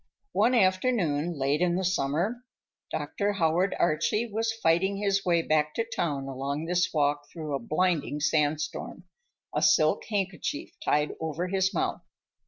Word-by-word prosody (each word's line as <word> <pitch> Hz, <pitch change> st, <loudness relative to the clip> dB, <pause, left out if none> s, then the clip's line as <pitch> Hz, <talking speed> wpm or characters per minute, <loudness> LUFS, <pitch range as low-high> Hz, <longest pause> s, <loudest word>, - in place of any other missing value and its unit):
One 250 Hz, -, +3 dB
afternoon, 185 Hz, -, +1 dB
late 140 Hz, +3 st, +1 dB
in 175 Hz, -1 st, +2 dB
the 190 Hz, -, -1 dB
summer, 175 Hz, -, 0 dB, 0.5 s
Dr. 205 Hz, 0 st, -2 dB
Howard 175 Hz, +1 st, +1 dB
Archie 170 Hz, +8 st, +1 dB
was 225 Hz, 0 st, -1 dB
fighting 190 Hz, -2 st, +1 dB
his 195 Hz, -1 st, +1 dB
way 170 Hz, -2 st, +2 dB
back 150 Hz, -1 st, +1 dB
to 230 Hz, -, +1 dB
town 160 Hz, -11 st, -2 dB
along 140 Hz, +3 st, -3 dB
this 180 Hz, +1 st, +1 dB
walk 145 Hz, -1 st, 0 dB
through 155 Hz, -3 st, -5 dB
a 140 Hz, -, 0 dB
blinding 155 Hz, +2 st, 0 dB
sandstorm, 150 Hz, 0 st, -1 dB, 0.5 s
a -, -, +1 dB
silk 155 Hz, -7 st, +4 dB
handkerchief 205 Hz, -, -3 dB
tied 150 Hz, -, +1 dB
over 160 Hz, +3 st, -2 dB
his 190 Hz, 0 st, +1 dB
mouth. -, -, -1 dB
170 Hz, 145 wpm, -28 LUFS, 150-195 Hz, 0.5 s, silk